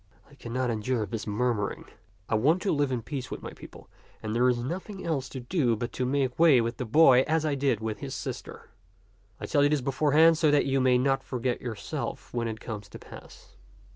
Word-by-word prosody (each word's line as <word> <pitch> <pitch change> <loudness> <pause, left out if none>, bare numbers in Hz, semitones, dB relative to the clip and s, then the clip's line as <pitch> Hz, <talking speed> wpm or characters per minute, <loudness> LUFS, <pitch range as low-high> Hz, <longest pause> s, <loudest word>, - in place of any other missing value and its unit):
I 140 - -20
cannot 125 -1 -3
endure 110 +1 -1
this 115 0 -5
murmuring; 105 -1 -1 0.4
I - - -3
want 145 +11 +3
to 200 - +1
live 145 -2 +1
in 120 -3 -2
peace 135 -4 -5
with - - -7
my - - -6
people; - - -13 0.4
and 110 -1 -3
there 125 +2 +3
is 125 - +1
nothing 185 - -5
else 140 -6 -2
to 130 - -7
do 125 -2 0
but 120 +2 -4
to 125 - -2
make 130 -1 -1
way 160 -6 +6
with 115 +1 -2
the 125 - -3
boy 130 +1 +6
as 160 0 +1
I 150 - +1
did 135 -5 0
with 110 -2 -4
his - - -6
sister. - - -7 0.7
I - - -5
tell 145 - +2
you 145 - +4
this 150 -1 +2
beforehand 155 +5 +4
so 155 -3 +4
that 145 0 +3
you 135 -1 +1
may 130 -1 +4
not 135 +1 +1
forget 125 -1 -3
yourself 110 -5 -5
when 120 -1 -1
it 110 -1 -5
comes 105 -4 -7
to - - -10
pass." - - -14
130 Hz, 220 wpm, -27 LUFS, 115-145 Hz, 0.7 s, way